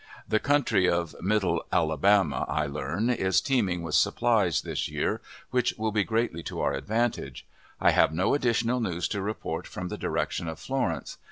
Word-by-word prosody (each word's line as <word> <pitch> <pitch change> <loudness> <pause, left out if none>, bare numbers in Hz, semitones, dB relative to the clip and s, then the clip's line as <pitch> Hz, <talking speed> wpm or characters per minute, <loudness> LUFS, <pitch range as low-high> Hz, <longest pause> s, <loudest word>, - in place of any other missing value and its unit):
The 110 - +2
country 115 -10 +2
of 85 -3 -1
Middle 100 +1 +1
Alabama, 80 -1 +2
I 75 - 0
learn, 75 - -1
is 95 -6 +2
teeming 100 -11 0
with 85 - -5
supplies - - +2
this - - -3
year, - - -1 0.3
which 125 -1 +1
will 110 0 -1
be 105 -1 +2
greatly 110 -7 -1
to - - -6
our - - +1
advantage. 115 +2 -2 0.3
I - - +5
have - - +4
no 85 +4 +1
additional 120 -2 +1
news 90 -7 -1
to 100 - -2
report 105 +2 -4
from 90 0 -6
the - - -6
direction 85 - -2
of 80 -1 -5
Florence. 95 - -3
100 Hz, 170 wpm, -27 LUFS, 85-115 Hz, 0.3 s, I